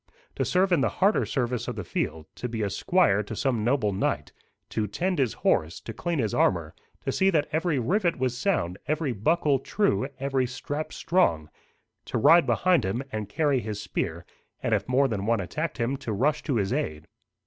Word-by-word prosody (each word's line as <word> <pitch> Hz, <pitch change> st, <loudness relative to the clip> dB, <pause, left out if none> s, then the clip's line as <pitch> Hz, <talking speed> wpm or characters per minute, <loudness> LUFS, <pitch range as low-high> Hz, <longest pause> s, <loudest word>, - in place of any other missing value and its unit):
To -, -, +1 dB
serve 185 Hz, +1 st, +2 dB
in 170 Hz, -5 st, +4 dB
the -, -, +2 dB
harder 200 Hz, +3 st, +3 dB
service 125 Hz, -4 st, -1 dB
of -, -, -3 dB
the -, -, -4 dB
field; 80 Hz, 0 st, -3 dB
to 125 Hz, -, -4 dB
be 115 Hz, -2 st, -2 dB
a 100 Hz, -, -1 dB
squire 165 Hz, -, +3 dB
to 105 Hz, +1 st, -6 dB
some 120 Hz, -2 st, 0 dB
noble 115 Hz, -4 st, +1 dB
knight; 95 Hz, -, -1 dB, 0.4 s
to 105 Hz, -1 st, -1 dB
tend 175 Hz, -, -1 dB
his 130 Hz, -5 st, +1 dB
horse, 80 Hz, +2 st, +2 dB
to 115 Hz, -, -7 dB
clean 170 Hz, +7 st, -2 dB
his 110 Hz, -6 st, 0 dB
armour, -, -, +1 dB, 0.3 s
to -, -, +1 dB
see 190 Hz, -, +3 dB
that 160 Hz, -6 st, +2 dB
every 160 Hz, -1 st, +1 dB
rivet 175 Hz, -, +1 dB
was 130 Hz, -1 st, 0 dB
sound, 120 Hz, -, -1 dB
every 155 Hz, -2 st, 0 dB
buckle 140 Hz, -, +2 dB
true, 195 Hz, -3 st, 0 dB
every 135 Hz, -1 st, 0 dB
strap 145 Hz, +5 st, -5 dB
strong; 80 Hz, -, +1 dB, 0.5 s
to -, -, -2 dB
ride 155 Hz, +6 st, +6 dB
behind 170 Hz, +9 st, +3 dB
him, 105 Hz, +8 st, -2 dB
and 105 Hz, -2 st, -4 dB
carry 145 Hz, +2 st, +1 dB
his 105 Hz, -3 st, -5 dB
spear, -, -, -3 dB, 0.4 s
and -, -, +1 dB
if -, -, 0 dB
more 135 Hz, +2 st, +4 dB
than 105 Hz, -4 st, -3 dB
one 115 Hz, -1 st, +2 dB
attacked 150 Hz, -, -3 dB
him, 125 Hz, +3 st, -1 dB
to 130 Hz, -4 st, -5 dB
rush 150 Hz, +9 st, +1 dB
to 140 Hz, -, -1 dB
his 100 Hz, 0 st, 0 dB
aid. 80 Hz, -, -2 dB
130 Hz, 200 wpm, -26 LUFS, 110-155 Hz, 0.5 s, ride